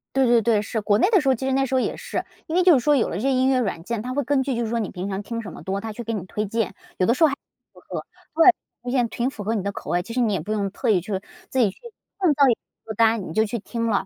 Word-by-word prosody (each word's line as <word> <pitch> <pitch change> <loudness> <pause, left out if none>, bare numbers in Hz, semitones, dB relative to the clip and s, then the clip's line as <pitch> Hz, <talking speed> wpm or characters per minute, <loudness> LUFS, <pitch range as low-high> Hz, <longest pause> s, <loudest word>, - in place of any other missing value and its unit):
对 265 -1 +4
对 235 -1 +5
对， 215 -1 +2
是。 220 +1 -3
国 205 0 +3
内 375 - +3
的 395 -7 +5
时 275 - -3
候， 260 - +5
其 265 - -5
实 265 - 0
那 270 0 +2
时 265 - -2
候 - - +4
也 - - -1
是， - - -4 0.2
因 320 - -3
为 365 - +4
就 360 -2 +7
是 265 - +5
说 295 -1 +4
有 240 - +2
了 - - -4
这 - - -3
些 270 - +2
音 260 +1 +3
乐 260 -1 +3
软 185 -8 -2
件， 230 +1 -3
它 250 +2 -4
会 285 0 0
根 270 +1 +2
据 265 -2 -1
就 235 - -1
是 220 - -3
说 235 0 0
你 210 - -2
平 185 +2 -5
常 195 +1 -3
听 230 +2 -5
什 210 - -8
么 - - -10
多， 195 +1 -2
它 225 -1 -5
去 240 - -6
给 230 +1 -3
你 190 -4 -4
推 210 +3 -3
荐， 220 -1 -1 0.2
有 185 - +2
的 235 - +4
时 320 - +1
候 - - +8
还 275 - -1
挺 - - -56 0.3
符 - - -17
合， - - -5 0.3
对， 340 +2 +7 0.3
发 250 - -4
现 245 -3 +1
挺 245 +2 -1
符 215 -6 -8
合 220 +3 -1
你 205 -4 -1
的 200 - -1
口 - - -8
味， 175 - +2
其 230 +5 -8
实 250 - +1
你 220 -3 +2
也 190 - 0
不 210 +6 -6
用 200 -2 -1
特 240 +2 -2
意 185 -5 +4
去 190 0 -3 0.3
自 260 - -1
己 220 -5 +4
去 - - -12 0.4
创 350 -6 +4
造 280 -1 +5
一 - - +5
个 - - -10 0.3
歌 220 - -5
单， 225 -3 +2
你 160 - -7
就 220 +2 +3
去 225 +2 -3
听 230 +2 -3
了。 205 -3 +1
230 Hz, 385 characters per minute, -23 LUFS, 205-260 Hz, 0.4 s, 候